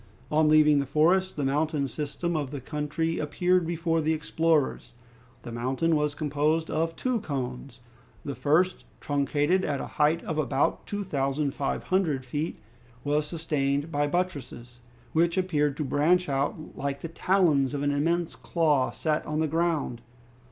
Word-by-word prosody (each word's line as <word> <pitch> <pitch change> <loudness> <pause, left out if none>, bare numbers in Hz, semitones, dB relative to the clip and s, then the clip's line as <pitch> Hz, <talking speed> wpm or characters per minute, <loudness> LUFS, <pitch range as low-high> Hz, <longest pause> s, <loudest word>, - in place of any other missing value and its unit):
On 155 0 +4
leaving 150 -1 +6
the 140 - -2
forest, 175 +7 +2
the 145 - -2
mountain 145 +1 0
system 150 +6 -3
of 145 -4 -1
the 145 0 -5
country 150 +4 -2
appeared 175 +3 +1
before 165 -1 0
the 155 +1 +1
explorers. 160 -1 0 0.5
The 120 - -8
mountain 130 +8 0
was 150 -1 0
composed 155 +2 0
of 165 +1 -1
two 255 -2 0
cones; 130 - -5 0.4
the 140 - -3
first, 165 +7 +1 0.2
truncated 145 +5 +1
at 140 -2 -1
a - - -4 0.2
height 155 +3 +3
of 155 -1 -3
about 140 -2 0
two 205 0 -3
thousand 140 -4 -1
five 140 -3 -2
hundred 160 -9 0
feet, 150 +6 -3 0.5
was 150 +1 0
sustained 150 -2 -1
by 145 -1 +1
buttresses, 130 -8 -4 0.3
which 170 +2 +2
appeared 150 -6 +1
to 155 - -1
branch 160 +6 +2
out 140 +3 -2
like 140 0 -3
the - - -4
talons 160 -5 +2
of 140 - -2
an 145 - +2
immense 165 0 0
claw 140 +2 +1
set 155 -1 -1
on 150 0 -1
the 160 - +2
ground. 160 -6 -1
150 Hz, 160 wpm, -27 LUFS, 140-165 Hz, 0.5 s, leaving